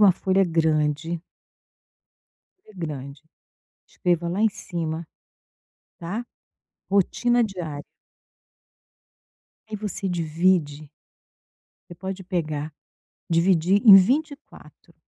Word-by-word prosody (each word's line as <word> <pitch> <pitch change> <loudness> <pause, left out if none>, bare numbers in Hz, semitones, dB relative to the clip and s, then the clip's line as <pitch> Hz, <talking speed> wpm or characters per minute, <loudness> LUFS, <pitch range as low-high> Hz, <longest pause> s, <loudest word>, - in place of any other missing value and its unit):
uma 205 -2 +8
folha 190 +2 +1
grande 160 -1 0 1.4
folha 215 - -18
grande, 145 -4 -6 0.7
escreva 175 -1 -1
lá 185 +4 -2
em 220 - +4
cima, 165 -4 -5 0.9
tá? 205 +8 -5 0.7
Rotina 240 +5 +2
diária. 170 -8 -6 1.9
E 215 - -3
você 200 -1 -4
divide 160 -3 0 1.0
Você - - -8
pode 190 +2 -6
pegar 155 -5 -3 0.6
dividir 175 +3 +3
em 210 - +11
24. 285 +9 -2
175 Hz, 85 wpm, -24 LUFS, 160-195 Hz, 1.9 s, em